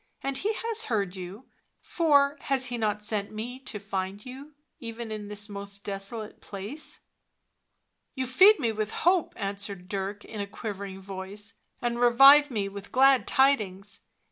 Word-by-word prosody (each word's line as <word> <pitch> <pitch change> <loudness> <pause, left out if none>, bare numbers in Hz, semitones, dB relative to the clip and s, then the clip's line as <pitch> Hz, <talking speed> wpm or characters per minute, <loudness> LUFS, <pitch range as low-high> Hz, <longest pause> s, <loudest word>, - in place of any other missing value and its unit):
" - - -48
And 275 -1 -1
He 425 +7 0
has 455 -1 +2
heard 200 -5 -1
*you, 190 +6 -8 0.3
for 285 -4 +3
has 270 -2 +1
He 245 -1 -3
not 210 -1 -1
sent 210 -2 -1
me 235 +4 -6
to 260 -5 -7
find 200 0 -4
you, 275 +4 -10 0.2
even 230 -1 -6
in 210 -1 -5
this 205 0 -5
most 200 -1 -7
desolate 205 +2 -6
place?" 210 +10 -5 0.6
" - - -49
You 260 -1 -1
feed 375 - +7
me 235 -5 +1
with 215 -1 -2 0.2
hope," 355 -1 +3
answered 195 -2 -4
Dirk 200 +1 -4
in 215 -2 -6
a 200 - -4
quivering 200 -2 -6
voice, 195 +3 -7
" - - -43
and 240 0 -1
revive 275 +5 +8
me 210 -6 -1
with 200 0 -9
glad 265 0 +5
tidings 215 -8 +2
215 Hz, 170 wpm, -27 LUFS, 200-265 Hz, 0.6 s, revive